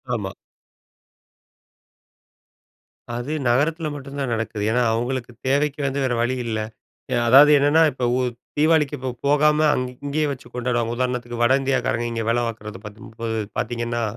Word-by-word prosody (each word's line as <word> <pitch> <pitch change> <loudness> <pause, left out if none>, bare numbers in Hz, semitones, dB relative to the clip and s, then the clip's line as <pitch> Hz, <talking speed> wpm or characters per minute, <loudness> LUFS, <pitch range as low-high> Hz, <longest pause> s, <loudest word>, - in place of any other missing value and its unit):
ஆமா. - - -4 2.8
அது 120 +5 -4 0.2
நகரத்தில 155 +5 +1
மட்டும் 140 0 -8
தான் 135 -3 -2
நடக்குது. 110 -2 -3
ஏன்னா, 125 +2 +2
அவங்களுக்கு 120 +1 -2 0.2
தேவைக்கு 145 +2 +1
வந்து 135 +1 -2
வேற 125 - 0
வழி 125 +2 0
இல்ல. 110 -2 -2 0.6
எ - - +2
அதாது 140 +5 +8
என்னன்னா? 145 +3 +4
இப்போ 130 -1 -3
ஊ - - +1 0.4
தீவாளிக்கு 150 -2 +3
இப்ப 130 0 -3 0.2
போகாம 150 +1 +4 0.2
அங் 130 - -1 0.2
இங்கயே 150 +2 0
வச்சு 130 -3 -10
கொண்டாடுவாங்க. 120 -1 -1
உதாரணத்துக்கு, 120 -1 -2
வட 120 +2 +4
இந்தியாக்காரங்க 125 -3 0
இங்க 115 -1 -2
வேல 120 +1 +1
பாக்குறது 110 -1 -8
10 105 +1 -11
30 115 0 -4 0.2
பாத்தீங்கன்னா, 120 0 -2
125 Hz, 145 wpm, -22 LUFS, 120-140 Hz, 2.8 s, அதாது